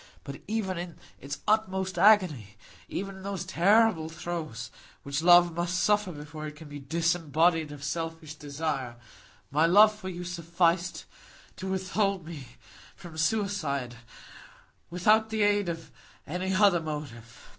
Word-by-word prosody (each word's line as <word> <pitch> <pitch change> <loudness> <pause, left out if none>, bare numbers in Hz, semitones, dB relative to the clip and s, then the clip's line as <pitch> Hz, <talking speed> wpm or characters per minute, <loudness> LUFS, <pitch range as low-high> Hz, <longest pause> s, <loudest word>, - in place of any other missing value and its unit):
But 140 - -8
even 195 -4 -2
in 175 -2 -7 0.2
its 140 +1 -7
utmost 190 -3 +1
agony—even 185 - +1
in - - -11
those 195 -2 -4
terrible 190 -2 +3
throes 155 -8 -6 0.3
that 140 +2 -2
love 175 0 +6
must 175 +2 -1
suffer 210 -1 +2
before 155 0 -8
it 150 - -9
can 155 0 -12
be 145 0 -8
disembodied 165 +1 +1
of 145 -1 -9
selfish 165 +1 -4
desire—my 140 -1 -4
love 210 +5 +7
for 210 -3 -8
you 180 -1 -6
sufficed 170 0 0 0.5
to 190 - -6
withhold 190 -1 -1
me 155 -6 -8 0.5
from 170 -3 -12
suicide, 160 - -1 0.9
without 215 +6 +3
the 220 -1 0
aid 205 -2 +2
of 165 -4 -6 0.3
any 180 +4 -3
other 190 -2 +4
motive. 145 -8 -8
170 Hz, 130 wpm, -28 LUFS, 150-190 Hz, 0.9 s, love